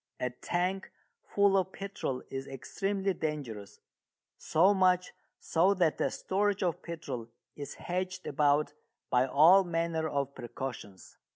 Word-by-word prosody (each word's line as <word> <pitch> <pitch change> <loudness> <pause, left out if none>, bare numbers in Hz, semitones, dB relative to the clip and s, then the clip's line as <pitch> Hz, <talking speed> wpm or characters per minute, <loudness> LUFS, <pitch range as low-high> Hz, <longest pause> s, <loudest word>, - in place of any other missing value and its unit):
A 125 - -1
tank 180 +8 -2 0.3
full 200 -1 +2
of 190 -1 +1
petrol 195 -10 -4
is 135 0 -5
extremely 195 +8 -2
dangerous, 140 - -5 0.6
so 185 +6 +3
much 185 -1 +2 0.3
so 185 +5 +2
that 170 -4 +1
the - - +2
storage 205 +1 0
of 175 -4 -1
petrol 135 -9 -6 0.3
is 145 -1 -7
hedged 185 +1 -4
about 145 +1 +2 0.4
by 125 +1 +3
all 165 +9 +7
manner 165 -2 -1
of 140 -1 -2
precautions. 120 -6 -8
165 Hz, 125 wpm, -31 LUFS, 135-190 Hz, 0.6 s, all